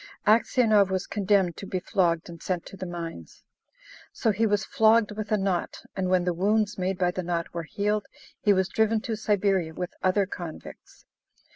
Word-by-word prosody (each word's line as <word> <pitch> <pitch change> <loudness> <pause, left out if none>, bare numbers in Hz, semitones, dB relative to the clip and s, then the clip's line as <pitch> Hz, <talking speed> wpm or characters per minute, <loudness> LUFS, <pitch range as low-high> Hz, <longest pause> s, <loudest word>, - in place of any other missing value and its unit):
Aksionov 215 -2 +4
was 190 0 -1
condemned 195 -4 +1
to 195 - -7
be 185 - -2
flogged 175 -4 0
and 170 -2 -10
sent 180 -2 -2
to - - -10
the 185 -1 -6
mines. 165 - -7 0.7
So 225 - +1
he 220 +3 +1
was 205 -2 +1
flogged 220 -3 +4
with 210 0 -6
a 215 - +4
knot, 195 -3 -2
and 185 -1 -1
when 185 -1 +3
the 180 0 0
wounds 205 +4 +1
made 185 0 -2
by 180 -1 +1
the 185 - -3
knot 170 -1 -3
were 170 - -3
healed, 210 +1 -1 0.3
he 205 - +4
was 190 -1 +3
driven 220 +1 +1
to 225 - -3
Siberia 195 -6 0
with 180 -1 -4
other 190 +2 +2
convicts. 175 -4 -9
195 Hz, 185 wpm, -26 LUFS, 180-210 Hz, 0.7 s, Aksionov